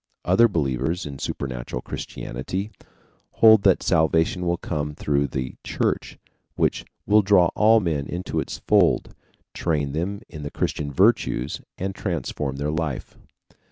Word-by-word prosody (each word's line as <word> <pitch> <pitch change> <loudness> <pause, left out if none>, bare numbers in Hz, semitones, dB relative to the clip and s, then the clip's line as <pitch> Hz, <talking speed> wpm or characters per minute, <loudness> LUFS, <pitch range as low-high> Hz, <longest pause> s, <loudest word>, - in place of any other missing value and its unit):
Other 95 +7 +5
believers 80 - -1
in 70 -2 -7
supernatural 60 -2 -4
Christianity 95 - -5 0.6
hold 110 -2 +7
that 95 - +4
salvation 80 +2 +2
will 85 0 +1
come 75 -3 -3
through 70 -1 0
the 65 -1 -5
Church, - - -2 0.4
which - - 0 0.2
will 105 +1 +5
draw 95 -4 +4
all 110 +1 +5
men 80 -8 -1
into 90 +1 -3
its - - -4
fold, - - +3 0.4
train 75 -4 -1
them 90 +7 -3
in 75 -3 -9
the 70 - -5
Christian 70 0 -2
virtues, 90 - +2 0.2
and 95 +1 -3
transform 75 - -3
their 70 +2 -2
life. 80 -4 -3
80 Hz, 135 wpm, -24 LUFS, 70-95 Hz, 0.6 s, hold